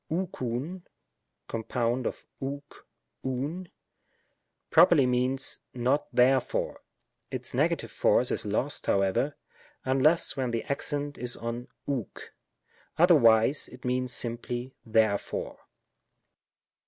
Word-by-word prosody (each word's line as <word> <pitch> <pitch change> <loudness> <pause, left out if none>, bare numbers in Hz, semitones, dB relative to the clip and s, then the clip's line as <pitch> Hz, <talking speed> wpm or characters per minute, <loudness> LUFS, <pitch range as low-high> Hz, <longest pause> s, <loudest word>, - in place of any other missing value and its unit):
ovxovv 160 -1 -3 0.7
(compound 120 +2 -1
of - - -6 0.2
ovx 140 +1 -4 0.4
— - - -52
ovv) 140 +8 -3 1.0
properly 165 -4 +6
means, 125 +2 0 0.2
^^not 130 +4 +1
therefore^ 130 +1 +2 0.5
Its - - -3
negative - - 0
force - - +3
is - - -1
lost, - - -1
however, 100 +9 +1 0.5
unless 135 +6 +3
when 130 -3 -1
the 115 -1 -2
accent 145 +1 -2
is 120 0 -1
on 115 +2 -5 0.2
ov?c. 135 -7 -3 0.7
Otherwise 140 -6 +5
it 125 +1 -13
means 125 0 0
simply 120 +1 -2
therefore. 110 -3 0
130 Hz, 100 wpm, -28 LUFS, 120-145 Hz, 1.0 s, properly